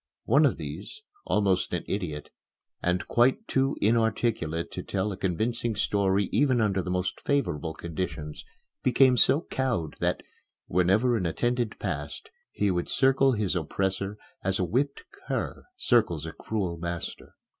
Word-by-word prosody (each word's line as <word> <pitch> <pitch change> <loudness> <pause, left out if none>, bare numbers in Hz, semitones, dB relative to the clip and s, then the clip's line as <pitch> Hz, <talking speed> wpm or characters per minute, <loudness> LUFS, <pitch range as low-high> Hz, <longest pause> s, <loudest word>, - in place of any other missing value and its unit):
One - - +5
of - - -1
these, 430 - -7 0.2
almost 95 -4 +1
an 90 - -1
idiot, 80 -7 -4 0.5
and 90 +1 0
quite 130 - +3
too 135 +1 +1
inarticulate 110 -7 +1
to - - -5
tell 100 +1 -2
a - - -4
convincing 110 +5 -1
story 100 -1 +1
even 130 +1 +3
under 100 -3 +2
the 90 - -5
most 90 0 -1
favorable 80 - -1
conditions, 80 -3 -5 0.4
became 130 +1 +5
so 140 +5 +5
cowed 110 - -1
that, - - 0 0.4
whenever 95 +8 +3
an 90 -5 0
attendant 120 +5 -1
passed, - - -5 0.2
he 100 - +1
would 90 -1 -1
circle 135 0 +4
his 105 -5 0
oppressor 95 +4 -1 0.3
as 95 0 +2
a - - 0
whipped 135 - -1 0.2
cur - - -3
circles 105 - +2
a 80 - -5
cruel 90 0 -3
master. 85 0 -5
100 Hz, 145 wpm, -27 LUFS, 90-120 Hz, 0.5 s, One